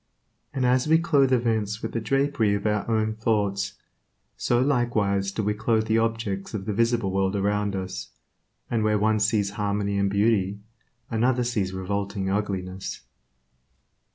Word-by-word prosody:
And 135 -3 -1
as 125 +2 +3
we 160 +1 +6
clothe 145 -6 +3
events 110 -4 0
with - - -3
the 115 - -1
drapery 135 -4 +1
of 100 - -4
our 105 +1 0
own 110 -1 +1
thoughts, 100 -3 0 0.6
so 120 - +1
likewise 110 -7 +1
do 110 - -2
we 105 +1 +1
clothe 110 +1 +1
the 110 0 +2
objects 115 -4 -2
of 95 -2 -4
the 105 - -2
visible 115 -2 +1
world 95 +1 0
around 100 0 0
us, 95 -1 -5 0.6
and 115 -2 0
where 105 0 +2
one 110 +1 +2
sees 105 -1 +1
harmony 100 -1 -1
and 100 0 +2
beauty, 100 -1 +1 0.5
another 120 +2 +2
sees 105 -6 -1
revolting 100 +1 -2
ugliness. 95 -2 -3
105 Hz, 155 wpm, -25 LUFS, 100-115 Hz, 0.6 s, we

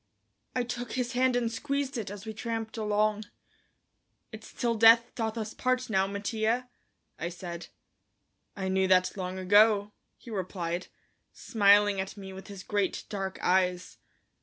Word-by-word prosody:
I 250 - +1
took 245 -1 -5
his 250 -1 -1
hand 255 0 +2
and 235 -2 0
squeezed 280 +2 -2
it 225 -5 -3
as 205 +1 -8
we 220 - -5
tramped 225 0 -4
along. 215 -1 0 1.1
"It's - - -10
till 240 -2 0
death 230 +1 +6
doth 225 -1 -3
us 220 0 -4
part 255 -1 -1
now, 190 -1 +2
Mattia," 220 +4 -1 0.5
I 170 - -2
said. 175 -1 -7 0.9
"I 190 -1 -3
knew 190 0 +2
that 185 -1 +3
long 185 -1 -4
ago," 205 +2 +4 0.3
he 235 - -12
replied, 180 -3 -3 0.5
smiling 205 -2 +4
at 195 +2 -7
me 190 -1 -8
with 190 0 -10
his 200 -2 -9
great, 205 -2 -1
dark 195 -2 -4
eyes. 180 0 +1
210 Hz, 150 wpm, -29 LUFS, 190-230 Hz, 1.1 s, death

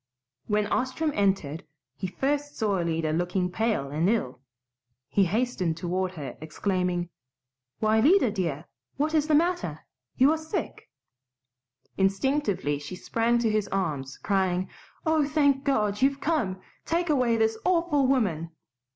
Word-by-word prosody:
When 210 0 +1
Ostrom 260 +8 0
entered 190 - 0 0.3
he 190 - -4
first 290 +8 -2
saw 205 -4 +1
Alida 165 -2 0
looking 180 +2 0
pale 215 -10 -1
and 160 +5 +1
ill. 170 - -1 0.7
He 195 +7 +3
hastened 190 -5 0
toward 185 +1 -2
her 150 -6 -7
exclaiming, 180 +1 -1 0.7
"Why, 215 0 +3
Lida, 290 - +5
dear, 170 -6 -2 0.3
what 300 +3 0
is 305 -1 +2
the 310 - +4
matter? 295 - 0 0.4
You 265 +3 +6
are 320 - 0
sick!" 320 +2 -5 1.1
Instinctively 195 - +1
she 150 +5 -7
sprang 230 +5 +1
to 235 -2 +1
his 215 -2 0
arms, 145 -9 -2
crying, 190 -2 0 0.4
"Oh, 315 -1 +3
thank 285 -2 +2
God! 210 -7 +1
You've 275 +1 +3
come. 275 - 0 0.2
Take 340 0 0
away 250 -5 +2
this 220 0 +2
awful 335 -6 +2
woman!" 190 - +1
210 Hz, 135 wpm, -27 LUFS, 180-275 Hz, 1.1 s, You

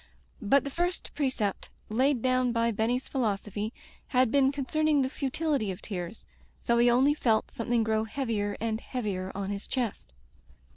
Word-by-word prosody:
But 270 +6 +4
the 280 - -5
first 350 +4 -2
precept 255 -9 -1 0.2
laid 255 +3 +2
down 255 -1 +2
by 230 0 +2
Benny's 230 +4 0
philosophy 210 -3 -2 0.4
had 255 -3 +3
been 275 -1 +4
con 280 -1 -4
cerning 310 -1 +2
the 260 - -2
futility 280 -5 -1
of 185 - -4
tears, 185 0 -6 0.3
so 235 0 +2
he 240 +1 +6
only 260 +4 +4
felt 225 -7 +1
something 230 0 0
grow 220 0 +1
heavier 220 -4 -2
and 220 0 -1
heavier 195 -7 -3
on 200 0 -3
his 200 0 -5
chest. 235 - -3
235 Hz, 160 wpm, -29 LUFS, 215-270 Hz, 0.4 s, he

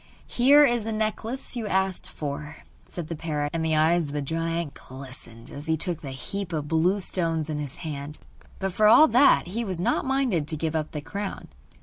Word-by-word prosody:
'Here 285 +4 +6
is 240 -4 +1
the 225 - -3
necklace 220 +4 -2
you 230 -3 -3
asked 190 -1 0
for,' 150 +1 -6 0.2
said 175 - -6
the 165 +1 -5
parrot. 150 -2 -2
And 165 -1 -1
the 160 -1 +1
eyes 160 +1 +3
of 140 - -8
the 145 - -1
giant 165 0 -2
glistened 130 -3 -10
as 145 +3 -8
he 160 0 +1
took 170 0 -2
the 140 - -6
heap 185 +8 -5
of 150 -2 -2
blue 170 +6 +2
stones 165 -4 0
in 150 - -2
his 145 -3 -5
hand. 150 -1 -5 0.4
But 195 -1 -3
for 215 +3 +4
all 305 +8 +8
that 245 -6 +5
he 230 +5 -2
was 185 -6 -2
not 175 - +1
minded 260 - 0
to 155 - -1
give 160 +1 -2
up 155 -1 -1
the 150 - -5
crown. 200 +5 -6
165 Hz, 210 wpm, -26 LUFS, 150-205 Hz, 0.4 s, all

